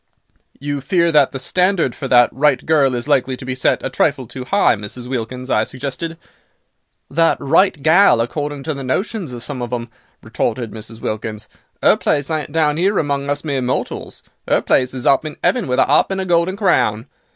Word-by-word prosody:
"You 145 0 -3
fear 170 +4 +1
that 145 -3 +4
the - - -5
standard 180 0 +1
for 135 - -6
that 120 -1 +5
'right 140 +1 +1
girl' 140 -5 +3
is 120 +2 -4
likely 135 -3 +1
to 130 - -9
be 130 - -3
set 125 - 0
a - - -1
trifle 130 -1 0
too 125 +2 -8
high 200 +7 +3
Mrs. 105 +4 -8
Wilkins," 125 +1 -4
I 110 - +3
suggested. 140 +7 -5 0.9
"That 165 0 +3
'right 165 +4 +2
gal,' 165 - +5
according 145 +4 -3
to 155 - -2
the 140 -1 -6
notions 185 - -2
of 120 -1 -7
some 135 -3 -5
of 120 - -5
'em," 120 -1 -4 0.3
retorted 120 -4 -2
Mrs. 110 +1 -8
Wilkins, 110 0 -4 0.4
"'er - - +6
place 145 0 -1
ain't 155 -1 -3
down 155 -1 +1
'ere 195 +3 +2
among 140 -2 -1
us 145 0 -1
mere 140 -4 -2
mortals; 125 +1 -4 0.3
'er - - +3
place 130 0 +1
is 125 - -5
up 135 +1 +4
in 155 -1 -7
'eaven 245 -7 +1
with 125 - 0
a - - +5
'arp - - +3
and 195 0 -2
a - - -3
golden 175 +2 +1
crown. 115 - +1
140 Hz, 200 wpm, -18 LUFS, 125-160 Hz, 0.9 s, er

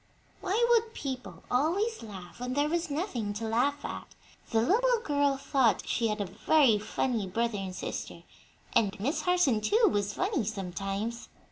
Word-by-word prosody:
Why 435 +6 +1
would 455 -1 +3
people 260 -3 -6
always 370 - +1
laugh 195 -4 -10
when 250 +1 -3
there 290 +1 +2
was 340 0 -1
nothing 280 - -2
to 225 +1 -3
laugh 275 +6 +1
at? - - -7 0.3
The 225 - +2
little 485 - +3
girl 285 -2 +2
thought 270 -4 +1
she 230 - +1
had 210 -1 -2
a 205 - -1
very 225 - +3
funny 215 0 -1
brother 230 +2 -1
and 190 -1 -5
sister, - - -5 0.5
and 205 -2 +2
Miss 275 - -1
Harson, 355 -11 +2
too, 430 - +4
was 205 0 -1
funny 380 - 0
sometimes. 195 +3 -4
250 Hz, 160 wpm, -29 LUFS, 210-320 Hz, 0.5 s, too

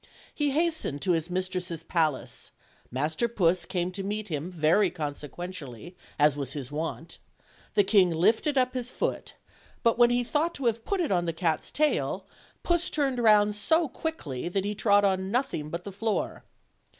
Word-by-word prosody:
He 295 -1 0
hastened 315 - 0
to 185 - +2
his 165 0 0
mistress' 180 -2 -3
palace; 160 -5 -1 0.4
Master 155 - 0
Puss 180 -6 +1
came 180 -1 -2
to 195 +2 -5
meet 210 +1 -3
him 155 +3 -3
very 175 +4 +3
consequentially, 150 0 -7 0.2
as 150 -1 +4
was 140 -2 -3
his 140 -3 -6
wont; 160 +2 -4 0.6
the 205 - +5
king 190 -2 +4
lifted 220 - +2
up 255 -1 +2
his 250 -1 -3
foot, - - -3 0.5
but 230 0 +3
when 240 0 +7
he 245 0 +2
thought 310 +7 0
to 275 - -5
have 230 -1 0
put 395 -2 0
it 330 - -1
on 175 -2 +2
the 165 - -1
cat's 160 -2 -1
tail, 305 0 0 0.4
Puss 345 +1 +2
turned 275 -6 0
round 210 -2 +5
so 320 +11 +2
quickly 175 - -4
that 195 +2 -1
he 205 - -1
trod 205 -1 +4
on 190 -1 +1
nothing 205 - -1
but 170 +2 -5
the 200 - -7
floor. 215 +2 -2
190 Hz, 175 wpm, -28 LUFS, 165-240 Hz, 0.6 s, when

